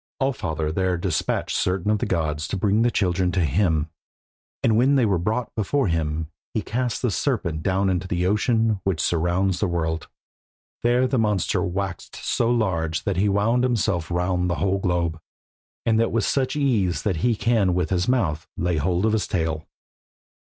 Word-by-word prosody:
All 135 0 +1
father 80 -7 -3
therefore 90 +1 0
despatched 85 - -1
certain 95 +2 0
of 105 - +1
the - - -1
gods 80 -3 -1
to - - -3
bring 105 +3 +2
the 120 - +4
children 90 -4 +1
to 90 -3 +2
him, 80 0 +1 0.8
and 115 - +3
when 130 +5 +4
they 130 -4 +4
were 95 -5 +1
brought 110 +7 -2
before 110 +2 0
him 80 -1 -2 0.2
he 110 - 0
cast 125 0 -2
the 125 - +2
serpent 95 - -1
down 95 +3 +1
into 95 0 0
the 90 0 -1
ocean 110 +1 +2
which 95 -5 0
surrounds 90 +3 +1
the 100 - +1
world. 80 -2 -2 0.7
There 120 +2 +3
the 130 -1 +1
monster 105 -5 +1
waxed 95 0 -4
so 115 - 0
large 90 -9 0
that 100 -5 -1
he 100 +2 +2
wound 110 +5 +2
himself 100 -9 0
round 90 +1 0
the 90 - 0
whole 95 +3 0
globe, 85 -3 -1 0.7
and 110 -1 +3
that 115 - +2
with 115 0 +1
such 130 -1 0
ease 115 - +1
that 100 -6 0
he 120 +7 +1
can 105 -4 +2
with 90 -2 -1
his 90 -1 +1
mouth 90 - 0
lay 90 -2 0
hold 90 +6 +1
of 110 - +2
his 110 - 0
tail. 80 -3 -2
95 Hz, 185 wpm, -23 LUFS, 85-110 Hz, 0.8 s, the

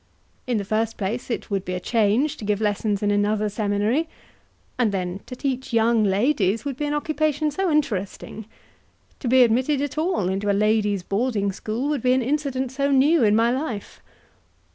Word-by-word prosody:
In 245 -3 +1
the 200 - -3
first 220 +2 -1
place 220 +6 -3
it 230 - -4
would 195 -2 0
be 180 -1 -4
a - - -2
change 230 +8 +1
to - - -9
give 205 -1 0
lessons 210 -1 -1
in 205 - +2
another 210 +1 +1
seminary, 210 +9 0 0.7
and 230 -4 +2
then 185 -1 -3
to 250 - -7
teach 260 -1 -3
young 230 0 +3
ladies 205 +1 +1
would 280 -2 -3
be 295 +3 -3
an 295 - -1
occupation 305 0 0
so 380 +5 -1
interesting 220 - -2 0.7
to 260 - -4
be 255 +1 +6
admitted 255 +5 +2
at 290 +2 -2
all 330 - 0
into 195 +2 -1
a 200 - +2
ladies' 210 -3 +1
boarding 205 0 0
school 220 +7 -3
would 295 -4 -1
be 250 +1 +3
an 260 -1 +1
incident 265 -1 -1
so 275 +1 0
new 280 +2 +4
in 210 -1 +4
my 230 +2 +3
life. 250 -6 -4
230 Hz, 185 wpm, -23 LUFS, 205-275 Hz, 0.7 s, be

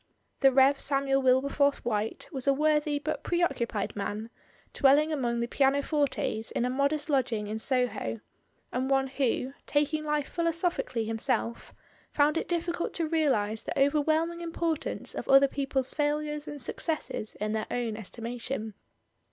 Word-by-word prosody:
The 270 -1 +6
Rev. 270 +1 +5
Samuel 275 -1 +1
Wilberforce 280 +2 +2
White 215 -2 -2
was 270 -3 -4
a 275 - +6
worthy 300 0 +2
but 310 +2 -3
preoccupied 245 - -1
man, 210 +3 -4 0.4
dwelling 295 +3 +4
among 240 -5 -1
the 235 - -1
piano 275 +2 +2
fortes 265 -7 -1
in 240 - -1
a 250 - 0
modest 280 +3 0
lodging 250 -7 0
in 215 +2 -4
Soho, 245 - -1 0.5
and 255 +2 -1
one 270 -1 +3
who, 265 -1 -1
taking 300 +1 +1
life 300 -2 -1
philosophically 335 -8 -1
himself, 230 +1 -2 0.4
found 295 +1 +2
it - - -1
difficult 340 0 -2
to 330 -2 0
realise 260 -10 +1
the - - -5
overwhelming 315 +4 +2
importance 330 -2 -3
of - - -6
other 275 +1 +7
people's 270 -1 -1
failures 300 0 -1
and 295 - -6
successes 265 -3 -3
in 210 0 -2
their 220 0 -2
own 240 -3 -2
estima 230 +3 -7
tion. 225 -4 -4
275 Hz, 150 wpm, -29 LUFS, 235-300 Hz, 0.5 s, other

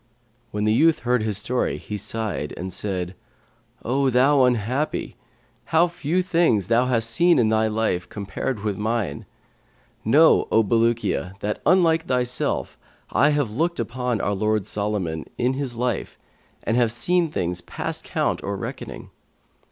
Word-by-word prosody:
When 105 -1 -3
the 110 0 +3
youth 160 +7 +3
heard 125 -1 +1
his 110 -2 0
story, 125 +5 -1
he 105 - -6
sighed 105 -6 -4
and 90 +1 -5
said, 95 -2 -3 0.7
'O 135 +3 +2
thou 130 +2 +4
unhappy! 125 +5 -1 0.5
How 165 +2 +3
few 175 +1 -1
things 165 - +2
thou 120 +2 +3
hast 115 -3 +1
seen 170 +9 +4
in 115 -4 +3
thy 110 0 +2
life 110 -5 -1
compared 105 +3 -4
with 105 -3 -2
mine. 110 -8 -2 0.8
Know, 150 +9 +5
O 110 - +5
Bulukiya, 110 -3 0
that 105 +1 -3
unlike 165 -2 +4
thyself 125 -1 -1 0.3
I 145 - +4
have 145 -7 0
looked 170 +5 0
upon 125 -2 -2
our 100 - 0
lord 105 0 0
Solomon, 100 -7 -2
in 125 +1 +1
his 135 -3 -3
life, 120 -2 -2 0.5
and 115 - 0
have 120 -2 +3
seen 170 +9 +1
things 90 - -2
past - - -5
count - - -1
or 100 0 -3
reckoning. - - -7
115 Hz, 150 wpm, -23 LUFS, 105-135 Hz, 0.8 s, Know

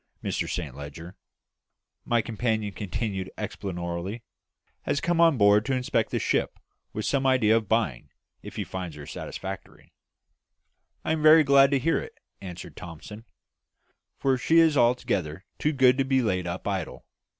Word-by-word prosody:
Mr - - -2
Saint 80 -7 -4
Leger," 75 +6 -9 0.9
my 120 -1 +2
companion 110 -2 -2
continued 95 -1 -4
explanatorily, 95 0 -5 0.6
"has 145 - -1
come 170 -1 +1
on 165 -4 +5
board 105 0 +5
to 130 +2 -1
inspect 125 -1 0
the - - -1
ship, - - 0 0.3
with 110 - -4
some 135 -1 +1
idea 115 -4 +4
of 110 -3 -1
buying, 110 - 0 0.3
if - - -10
he - - -2
finds 90 -4 -6
her 75 -1 -9
satisfactory." 95 +5 -8 1.1
"I - - 0
am 160 -1 0
very 155 +1 +8
glad 140 -1 +6
to 140 - +2
hear 165 +5 +1
it," - - -10 0.2
answered 90 -4 -9
Thomson, 95 +6 -10 0.9
"for 130 -2 +1
she 160 +5 +3
is 165 -2 +5
altogether 100 - +1
too 150 - +1
good 130 -2 +4
to - - +4
be 130 -1 +1
laid 90 -5 -1
up 85 +2 -5
idle. - - -4
110 Hz, 155 wpm, -26 LUFS, 90-135 Hz, 1.1 s, very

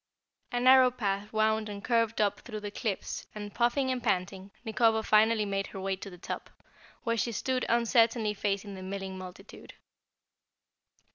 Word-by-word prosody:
A 245 - 0
narrow 255 +1 +7
path 205 -4 -2
wound 220 0 +1
and 200 0 -7
curved 230 -2 +1
up 205 -1 +1
through 215 -4 -7
the 205 0 -5
cliffs 205 -1 -4
and, 205 -1 -6
puffing 250 +3 +1
and 255 -1 -2
panting, 195 -3 -1 0.2
Nikobo 225 0 +2
finally 215 0 +4
made 195 0 -2
her 195 - -8
way 190 0 -1
to 200 - -8
the 180 - -12
top, 175 - -6 0.5
where 230 -2 0
she 235 - 0
stood 255 +4 -1
uncertainly 230 -2 +3
facing 200 0 -2
the 190 - -8
milling 190 0 -5
multitude. 185 +2 -11
215 Hz, 160 wpm, -30 LUFS, 195-230 Hz, 0.5 s, narrow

